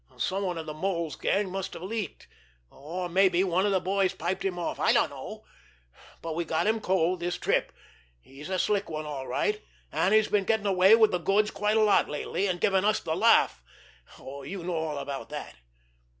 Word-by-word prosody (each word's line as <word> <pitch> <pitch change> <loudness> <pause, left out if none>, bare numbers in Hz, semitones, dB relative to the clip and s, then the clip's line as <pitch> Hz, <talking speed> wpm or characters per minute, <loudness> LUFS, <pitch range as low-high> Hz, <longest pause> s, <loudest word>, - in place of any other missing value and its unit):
Someone 185 -2 -1
of 160 - -5
the 155 - -5
Mole's 170 -1 -2
gang 195 -2 0
must 195 0 -4
have - - -8
leaked; 215 +1 -5 0.5
or 175 +6 -5
maybe 185 0 +3
one 185 +1 +1
of 200 - +1
our - - +3
boys 190 +1 0
piped 180 +2 -3
him 185 -2 -2
off. 175 - -3
I - - +3
dunno. - - -1 0.8
But 165 -1 -3
we 170 +2 -1
got 160 -1 -1
him 220 +1 +1
cold 185 -2 +1
this 175 +1 -2
trip. - - 0 0.5
He's 135 - -12
a 190 - -1
slick 205 +2 0
one 155 -1 -4
all 140 -3 -5
right, 425 0 -1 0.3
and 190 - +1
he's 215 -1 +4
been 205 -2 +1
getting 220 -1 +1
away 190 +2 +6
with 220 -2 +4
the 180 - 0
goods 205 +5 +2
quite 210 +1 0
a 220 - +4
lot 210 -1 +3
lately, 170 +6 -2
and 180 -2 -2
giving 190 +1 +2
us 215 +1 +2
the 160 - -3
laugh. - - +4 0.6
You 140 +7 -8
know 180 +1 -3
all 160 -2 -2
about 140 -1 -5
that. - - -7
185 Hz, 200 wpm, -27 LUFS, 165-200 Hz, 0.8 s, away